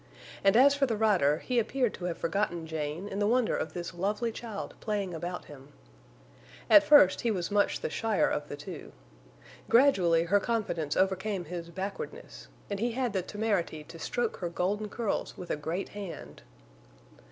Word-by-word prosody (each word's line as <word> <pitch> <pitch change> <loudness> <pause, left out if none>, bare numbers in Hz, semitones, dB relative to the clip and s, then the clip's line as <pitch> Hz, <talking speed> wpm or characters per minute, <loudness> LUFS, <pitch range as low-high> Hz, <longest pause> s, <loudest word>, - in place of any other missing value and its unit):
And 195 +2 +5
as 280 +3 +7
for 285 -1 +1
the 225 -3 -1
rider, 185 -10 +3
he 250 -2 +2
appeared 245 +1 0
to 180 - -6
have 175 -2 -2
forgotten 170 -1 -1
Jane 160 +3 -4
in 200 0 -4
the 205 - +2
wonder 245 0 +2
of - - -3
this 175 0 -5
lovely 205 +6 -1
child 220 -3 -6
playing 205 -4 -2
about 175 +2 -5
him. 140 0 -14 1.0
At 310 - +10
first 290 -11 +6
he 235 - 0
was 185 -4 -2
much 205 0 +2
the - - -2
shyer 225 -3 +1
of 145 0 -2
the 145 - -6
two. 160 +6 -9 0.8
Gradually 190 -11 +5
her 195 +4 +3
confidence 195 -10 -2
overcame 190 0 0
his 170 +1 -6
backwardness, 190 +3 -7 0.2
and 200 -1 -4
he 235 +2 0
had 245 -3 -1
the 190 - +1
temerity 195 -6 -2
to 165 +2 -12
stroke 240 +6 -2
her 175 - -3
golden 205 +5 -1
curls 225 -2 -3
with 180 - -6
a - - +1
great 160 +6 -4
hand. 200 -4 -8
195 Hz, 175 wpm, -29 LUFS, 170-220 Hz, 1.0 s, At